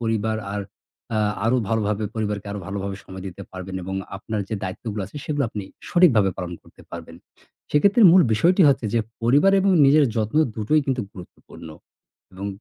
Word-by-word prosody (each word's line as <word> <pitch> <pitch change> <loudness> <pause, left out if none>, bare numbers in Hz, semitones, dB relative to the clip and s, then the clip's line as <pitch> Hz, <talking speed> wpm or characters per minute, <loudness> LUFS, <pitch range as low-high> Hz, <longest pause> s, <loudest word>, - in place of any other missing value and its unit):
পরিবার 110 -1 -1 0.2
আর 105 - -2 0.6
আ - - +2 0.3
আরও 120 +3 +3
ভালোভাবে 105 -1 0
পরিবারকে 105 -2 -3
আরও 105 - -5
ভালোভাবে 100 0 -4
সময় 95 -1 -9
দিতে 100 +2 -10
পারবেন 95 0 -7
এবং 95 +1 -5 0.2
আপনার 105 +1 -4
যে 110 - -2
দায়িত্বগুলা 100 +2 -4
আছে - - -13
সেগুলা 145 -3 -1
আপনি 105 -3 -5 0.2
সঠিকভাবে 120 - +4
পালন 90 -1 -5
করতে - - -19
পারবেন। 85 -1 -9 0.5
সেক্ষেত্রে 200 +10 +4
মূল 180 0 +7
বিষয়টি 175 - +3
হচ্ছে 135 -5 +1
যে 115 - +3 0.2
পরিবার 145 +12 +4
এবং 195 0 +2 0.2
নিজের 145 +1 +5
যত্ন 110 +5 -1 0.2
দুটোই 130 +9 +2
কিন্তু 130 -2 0
গুরুত্বপূর্ণ 90 -2 -13 0.6
এবং 95 +2 -6
110 Hz, 165 wpm, -23 LUFS, 100-140 Hz, 0.6 s, মূল